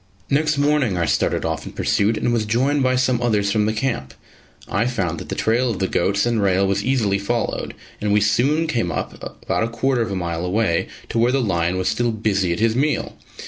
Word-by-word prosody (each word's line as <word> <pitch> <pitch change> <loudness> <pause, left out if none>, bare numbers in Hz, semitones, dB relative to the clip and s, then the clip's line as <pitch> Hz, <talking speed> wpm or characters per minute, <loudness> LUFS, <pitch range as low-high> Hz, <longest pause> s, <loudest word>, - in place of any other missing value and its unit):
Next 150 +1 +2
morning 145 -8 +2
I 85 - +1
started - - 0
off - - -3
in - - -8
pursuit 105 +2 +1
and 120 - 0
was 110 -3 0
joined 135 +6 +1
by 130 -1 +2
some 125 -1 +1
others 105 -4 +1
from 105 -1 +1
the - - +1
camp. 110 - -3 0.5
I 110 +5 0
found 95 -9 -2
that - - -9
the - - -3
trail 120 +3 +1
of 110 - -2
the 95 - 0
goats 100 +4 +1
and 120 -2 +1
rail 95 0 +2
was 100 +1 0
easily 110 -6 +1
followed, 115 +3 -2 0.3
and 105 0 0
we 105 - +4
soon 125 +10 +2
came 130 -8 -1
up, - - -5 0.2
about - - 0
a - - 0
quarter 120 +2 0
of 115 - -1
a - - -2
mile 85 -2 -3
away, 90 -1 0 0.2
to 115 - -1
where 120 +2 +3
the 135 - +2
lion 90 -6 0
was 95 - -1
still 120 -1 +1
busy 100 -4 0
at 85 - -2
his 115 0 +2
meal. 145 +4 0
110 Hz, 225 wpm, -21 LUFS, 100-125 Hz, 0.5 s, we